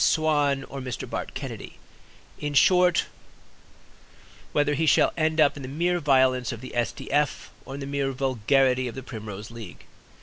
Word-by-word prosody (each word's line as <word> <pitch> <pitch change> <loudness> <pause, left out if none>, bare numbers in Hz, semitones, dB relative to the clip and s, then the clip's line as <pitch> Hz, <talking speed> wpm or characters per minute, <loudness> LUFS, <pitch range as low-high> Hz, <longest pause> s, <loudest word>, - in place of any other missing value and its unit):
Swan 145 -3 +2
or 140 - -8
Mr. 130 -2 -5
Bart - - -5
Kennedy; - - -6 0.7
in 145 -1 -3
short, 180 +3 +5 1.5
whether 145 0 +2
he 160 +3 0
shall - - +4
end 160 -1 0
up 150 -2 +5
in 145 - -8
the 130 - -6
mere 175 +5 0
violence 130 -5 +3
of 115 - -6
the 130 - -9
S. 120 -2 +1
D. - - -9
F., 145 0 0
or 135 - -7
in 140 - -7
the - - -4
mere 140 -1 -1
vulgarity 130 0 +1
of 120 - -6
the 130 - -6
Primrose 110 -3 -8
League. 115 -6 -10
135 Hz, 175 wpm, -26 LUFS, 130-150 Hz, 1.5 s, short